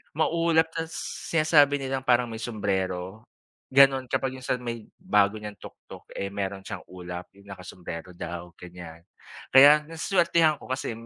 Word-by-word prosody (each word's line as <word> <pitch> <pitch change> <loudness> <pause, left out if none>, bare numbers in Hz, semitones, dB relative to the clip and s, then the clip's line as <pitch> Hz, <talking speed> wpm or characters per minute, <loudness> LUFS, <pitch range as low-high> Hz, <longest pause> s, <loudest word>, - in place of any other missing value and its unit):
Maulap 165 0 +2
tas 165 0 -4 0.4
sinasabi 150 -3 +4
nilang 135 -1 -3
parang 125 -1 +3
may 115 - -7
sumbrero. 95 -3 -3 0.5
Ganon, 135 -1 +6
kapag 130 -1 -1
yung 130 - -11
sa 125 -1 -1
may 115 -2 -6 0.2
bago 105 +1 +2
niyang 105 -1 -8
tuktok, - - -13
eh, 100 - -4
meron 100 -1 -4
siyang 95 - -8
ulap 90 -1 -8
yung 100 +1 -20
naka 95 -2 -10
sumbrero 90 -1 -8
daw 85 0 -7
ganyan. 85 -2 -11 0.5
Kaya 150 +3 +7
na 165 - -10
swertehan 165 -4 +2
ko - - -13
kasi 130 -2 -3
120 Hz, 155 wpm, -26 LUFS, 95-145 Hz, 0.5 s, Kaya